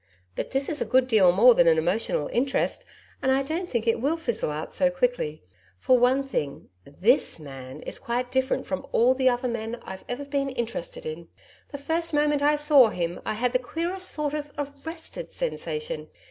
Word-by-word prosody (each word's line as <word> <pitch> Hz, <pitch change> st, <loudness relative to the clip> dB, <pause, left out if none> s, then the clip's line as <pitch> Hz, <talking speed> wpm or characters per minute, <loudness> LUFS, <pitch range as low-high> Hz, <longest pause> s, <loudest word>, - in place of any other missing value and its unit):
But -, -, -3 dB
this 270 Hz, +1 st, 0 dB
is 305 Hz, -, -1 dB
a -, -, +1 dB
good 255 Hz, 0 st, +3 dB
deal 205 Hz, -7 st, +5 dB
more 235 Hz, +7 st, +7 dB
than 175 Hz, -6 st, +4 dB
an 160 Hz, -1 st, +5 dB
emotional 175 Hz, -2 st, 0 dB
interest, 270 Hz, -, 0 dB, 0.4 s
and 265 Hz, -, +2 dB
I 270 Hz, +1 st, +2 dB
don't 335 Hz, +6 st, -3 dB
think 235 Hz, -2 st, -1 dB
it 230 Hz, -1 st, +1 dB
will 300 Hz, +5 st, +1 dB
fizzle 235 Hz, -, -2 dB
out 150 Hz, +1 st, -5 dB
so 275 Hz, -, +3 dB
quickly. 250 Hz, -, -1 dB, 0.3 s
For 255 Hz, -, +3 dB
one 250 Hz, +2 st, +3 dB
thing, 150 Hz, -, -4 dB, 0.2 s
THIS 195 Hz, -, +1 dB
man 135 Hz, -3 st, -9 dB
is -, -, -4 dB
quite 245 Hz, +1 st, -2 dB
different 260 Hz, 0 st, 0 dB
from 185 Hz, -, -4 dB
all 245 Hz, +3 st, +5 dB
the 260 Hz, 0 st, +3 dB
other 245 Hz, +1 st, -1 dB
men 235 Hz, 0 st, -4 dB
I've 190 Hz, 0 st, -8 dB
ever 265 Hz, +4 st, -4 dB
been 280 Hz, -1 st, -1 dB
interested -, -, -4 dB
in. 470 Hz, 0 st, -6 dB, 0.4 s
The 285 Hz, -, -5 dB
first 325 Hz, +3 st, -1 dB
moment 295 Hz, -1 st, +2 dB
I 295 Hz, +1 st, +4 dB
saw 295 Hz, -4 st, +6 dB
him, 175 Hz, -3 st, -3 dB
I -, -, -1 dB
had 245 Hz, +3 st, 0 dB
the 255 Hz, -, +3 dB
queerest 340 Hz, +8 st, -3 dB
sort 300 Hz, -1 st, -2 dB
of 295 Hz, -1 st, -4 dB
ARRESTED 320 Hz, -, -6 dB
sensation. 480 Hz, -1 st, -3 dB
260 Hz, 195 wpm, -26 LUFS, 225-295 Hz, 0.4 s, more